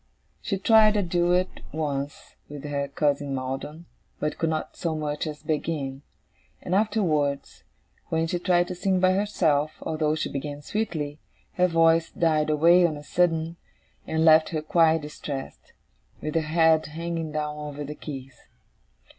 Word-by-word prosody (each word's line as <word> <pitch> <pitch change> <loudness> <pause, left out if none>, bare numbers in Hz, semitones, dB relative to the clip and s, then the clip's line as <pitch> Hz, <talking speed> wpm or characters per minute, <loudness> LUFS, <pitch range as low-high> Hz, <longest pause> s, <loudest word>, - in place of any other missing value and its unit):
She 195 - -2
tried 215 +1 +5
a 205 - +2
duet, 175 +1 +1
once, 145 -2 -4
with 145 -1 -8
her 140 -1 -2
cousin 145 -2 0
Maldon, 135 +5 -5 0.3
but 150 0 -2
could 165 - +1
not 155 -1 -3
so 165 -2 -2
much 150 0 -3
as 150 -1 -7
begin; 150 -4 -2 0.6
and 180 - -4
afterwards, 175 -9 0 0.5
when 160 0 +1
she 175 +2 -2
tried 175 -1 +2
to - - -3
sing 185 +1 0
by 185 0 +4
herself, 160 -7 +1
although 155 -1 0
she 155 - -2
began 145 +1 -5
sweetly, 155 -8 -3 0.3
her 180 0 +3
voice 165 -1 +3
died 155 -2 +1
away 170 +4 +5
on 160 -3 +1
a 145 - -10
sudden, 165 0 0 0.5
and 160 0 +1
left 160 0 +6
her 155 -2 -3
quite 160 0 +3
distressed, 145 -2 -7 0.5
with 155 - -4
her 165 - +2
head 160 0 +3
hanging 165 0 -4
down 150 0 -2
over 150 -1 -6
the 145 +1 -6
keys. 135 -5 -9
155 Hz, 155 wpm, -26 LUFS, 150-170 Hz, 0.6 s, left